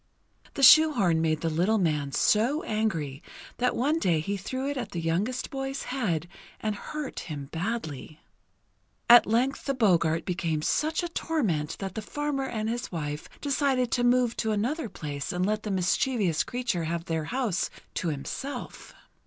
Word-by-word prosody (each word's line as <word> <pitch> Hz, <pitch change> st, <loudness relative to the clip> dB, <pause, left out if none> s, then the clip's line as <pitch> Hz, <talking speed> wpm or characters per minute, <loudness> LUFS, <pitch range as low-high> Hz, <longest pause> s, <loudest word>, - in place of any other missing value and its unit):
The 275 Hz, -, -2 dB
shoehorn 245 Hz, -, +7 dB
made 155 Hz, -1 st, +1 dB
the 165 Hz, -, 0 dB
little 180 Hz, +8 st, +2 dB
man 150 Hz, -7 st, 0 dB
so 235 Hz, -, +2 dB
angry 165 Hz, -11 st, -2 dB, 0.4 s
that 250 Hz, 0 st, +1 dB
one 295 Hz, +7 st, +1 dB
day 170 Hz, -, +2 dB
he 195 Hz, +6 st, -2 dB
threw 260 Hz, +8 st, -4 dB
it 285 Hz, -, -2 dB
at 250 Hz, -4 st, -5 dB
the 170 Hz, -, -2 dB
youngest 185 Hz, +10 st, -1 dB
boy's 270 Hz, 0 st, -3 dB
head 180 Hz, -, -1 dB, 0.3 s
and 215 Hz, -1 st, -1 dB
hurt 300 Hz, +6 st, -5 dB
him 145 Hz, -4 st, -6 dB
badly. 165 Hz, -, -4 dB, 0.9 s
At 240 Hz, 0 st, +8 dB
length 245 Hz, +5 st, +1 dB
the 275 Hz, -, 0 dB
Boggart 170 Hz, -8 st, +2 dB
became 170 Hz, -4 st, -1 dB
such 315 Hz, -, +1 dB
a -, -, -1 dB
torment 200 Hz, -, -1 dB
that 195 Hz, -2 st, -5 dB
the 220 Hz, -, -4 dB
farmer 280 Hz, +3 st, -2 dB
and 220 Hz, -3 st, -3 dB
his 240 Hz, +2 st, -3 dB
wife 150 Hz, -3 st, -4 dB
decided 270 Hz, -3 st, +1 dB
to 245 Hz, -, +1 dB
move 245 Hz, -1 st, +3 dB
to 220 Hz, -, 0 dB
another 235 Hz, +6 st, -1 dB
place 145 Hz, -1 st, -5 dB
and 180 Hz, -1 st, 0 dB
let 215 Hz, +1 st, 0 dB
the 215 Hz, -, -5 dB
mischievous 190 Hz, -, +1 dB
creature 240 Hz, -9 st, -2 dB
have 170 Hz, +1 st, -3 dB
their 160 Hz, -2 st, -2 dB
house 235 Hz, -4 st, -1 dB, 0.2 s
to 175 Hz, -, -2 dB
himself. 160 Hz, -, -5 dB
215 Hz, 165 wpm, -27 LUFS, 165-255 Hz, 0.9 s, At